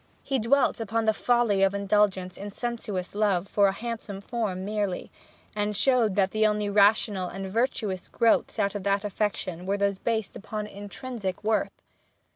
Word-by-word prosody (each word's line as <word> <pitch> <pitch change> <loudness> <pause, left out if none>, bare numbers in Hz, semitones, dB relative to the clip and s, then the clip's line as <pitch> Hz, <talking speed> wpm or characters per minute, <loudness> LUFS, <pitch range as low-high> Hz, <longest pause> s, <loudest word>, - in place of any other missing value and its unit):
He 270 -1 0
dwelt 245 +1 +2
upon 225 +1 -1
the 220 - +4
folly 235 -4 +2
of 195 +1 +3
indulgence 200 -2 +1
in 205 +1 -6
sensuous 210 -4 -4
love 200 -3 +1
for 200 0 +3
a - - +2
handsome 220 -1 -5
form 200 -4 -3
merely; 205 -3 -2 0.4
and 205 -1 -1
showed 240 -6 +3
that 195 -1 +2
the 215 0 +3
only 210 -1 0
rational 200 -2 +3
and 195 +2 -5
virtuous 210 -3 -1
growths 230 -1 +2
of 200 0 0
that 200 +1 0
affection 190 -4 -2
were 200 +1 +1
those 200 -1 0
based 220 -2 -2
upon 210 +1 -5
intrinsic 205 0 -6
worth. 220 +1 -1
205 Hz, 160 wpm, -27 LUFS, 195-220 Hz, 0.4 s, the